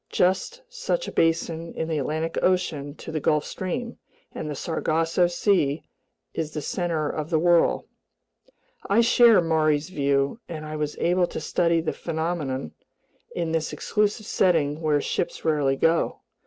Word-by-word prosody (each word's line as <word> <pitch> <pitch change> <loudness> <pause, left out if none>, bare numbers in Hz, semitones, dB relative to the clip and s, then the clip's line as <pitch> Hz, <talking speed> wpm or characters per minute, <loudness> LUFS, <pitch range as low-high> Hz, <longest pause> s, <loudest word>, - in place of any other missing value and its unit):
Just 190 - 0
such - - -2
a - - -4
basin 165 0 0
is 160 - -2
the 160 -2 -1
Atlantic 155 +4 -2
Ocean 160 -6 0
to 160 - -8
the 155 - -1
Gulf 150 0 +1
Stream, 235 +6 -4 0.3
and 150 - -5
the 150 - -4
Sargasso 165 +3 +1
Sea 175 -5 +1 0.5
is 160 -2 -2
the 155 0 -5
center 165 -2 -1
of 155 +1 -4
the 165 - +2
whirl." 170 +1 +3 1.0
I 205 +4 +5
share 230 -3 +6
Maury's 155 -1 +1
view, 140 +2 +1
and 155 -2 -6
I 155 0 -5
was 150 -1 -3
able 175 +1 +2
to - - -5
study 170 -1 +1
the 160 - -2
phenomenon 160 - -3 0.6
in 170 -2 -1
this 160 -1 -1
exclusive 210 0 -1
setting 160 -6 +1
where 150 -2 +2
ships 175 - -3
rarely 145 -4 +2
go. 165 +4 +1
165 Hz, 155 wpm, -25 LUFS, 150-180 Hz, 1.0 s, share